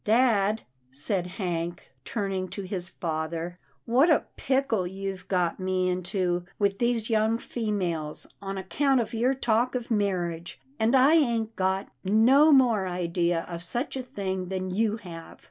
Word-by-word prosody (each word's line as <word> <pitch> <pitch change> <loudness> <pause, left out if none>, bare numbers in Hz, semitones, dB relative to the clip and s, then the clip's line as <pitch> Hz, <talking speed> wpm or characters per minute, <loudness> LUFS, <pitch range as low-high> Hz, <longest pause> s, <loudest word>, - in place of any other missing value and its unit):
" - - -44
Dad," 220 -2 +3 0.3
said 175 +7 -2
Hank, 175 -3 -4
turning 195 - -2
to 200 - -6
his 185 -2 -2
father, 165 +1 -4
" - - -40
what 255 +8 +4
a 310 - +4
pickle 260 -8 0
you've 195 0 -5
got 180 -2 0
me 185 0 0
into 180 -1 -1
with 200 -1 +1
these 235 -2 +1
young 220 +1 +3
females, 185 -11 -3 0.2
on 195 0 -4
account 265 +8 +1
of 230 -1 -2
your 245 +4 +2
talk 240 0 +1
of 245 -1 -4
marriage, 175 -5 -1 0.2
and 225 +4 +3
I 265 +4 +6
ain't 235 -8 +2
got 190 +1 0
no 245 +10 +5
more 235 -8 +4
idea 175 -1 0
of 170 -1 -6
such 240 - -3
a 265 - -2
thing 190 -7 -4
than 185 0 -3
you 215 +3 +1
have." 170 -6 -10
195 Hz, 160 wpm, -27 LUFS, 180-230 Hz, 0.3 s, I